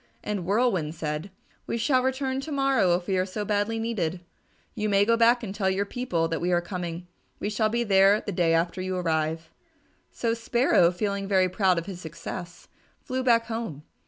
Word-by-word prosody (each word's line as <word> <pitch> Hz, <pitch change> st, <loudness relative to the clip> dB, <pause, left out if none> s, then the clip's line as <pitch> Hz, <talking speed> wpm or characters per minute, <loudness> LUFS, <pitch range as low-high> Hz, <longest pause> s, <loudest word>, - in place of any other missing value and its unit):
And 200 Hz, -4 st, -3 dB
Whirlwind 195 Hz, -8 st, +1 dB
said, 155 Hz, +2 st, -4 dB, 0.4 s
"We -, -, -1 dB
shall 255 Hz, +3 st, +2 dB
return 265 Hz, +1 st, -1 dB
to 310 Hz, -, -7 dB
morrow 270 Hz, -10 st, +3 dB
if 175 Hz, 0 st, -4 dB
we 190 Hz, -1 st, 0 dB
are 185 Hz, -, +1 dB
so 205 Hz, +2 st, -4 dB
badly 205 Hz, +2 st, 0 dB
needed. 200 Hz, -7 st, -2 dB, 0.5 s
You 215 Hz, 0 st, -2 dB
may 200 Hz, 0 st, +4 dB
go 230 Hz, +2 st, +4 dB
back 235 Hz, +1 st, +4 dB
and 195 Hz, -3 st, -4 dB
tell 195 Hz, -2 st, 0 dB
your 195 Hz, +2 st, 0 dB
people 200 Hz, -8 st, -1 dB
that 165 Hz, 0 st, -3 dB
we 180 Hz, +1 st, 0 dB
are 175 Hz, -, +3 dB
coming. 175 Hz, -1 st, -5 dB, 0.3 s
We 205 Hz, -, -2 dB
shall 215 Hz, +1 st, +1 dB
be 235 Hz, +2 st, 0 dB
there 200 Hz, -1 st, +5 dB
the -, -, -5 dB
day 170 Hz, -3 st, +2 dB
after 170 Hz, +2 st, 0 dB
you 185 Hz, 0 st, -2 dB
arrive." 160 Hz, -1 st, -1 dB, 0.6 s
So 230 Hz, -1 st, -1 dB
Sparrow, 230 Hz, -5 st, +3 dB
feeling 200 Hz, +2 st, -2 dB
very 190 Hz, -2 st, +3 dB
proud 185 Hz, -1 st, +2 dB
of 170 Hz, -, -2 dB
his 185 Hz, -3 st, -7 dB
success, 170 Hz, +2 st, -8 dB, 0.4 s
flew 260 Hz, 0 st, -2 dB
back 230 Hz, -2 st, +4 dB
home. 225 Hz, -11 st, -5 dB
195 Hz, 195 wpm, -26 LUFS, 175-230 Hz, 0.6 s, there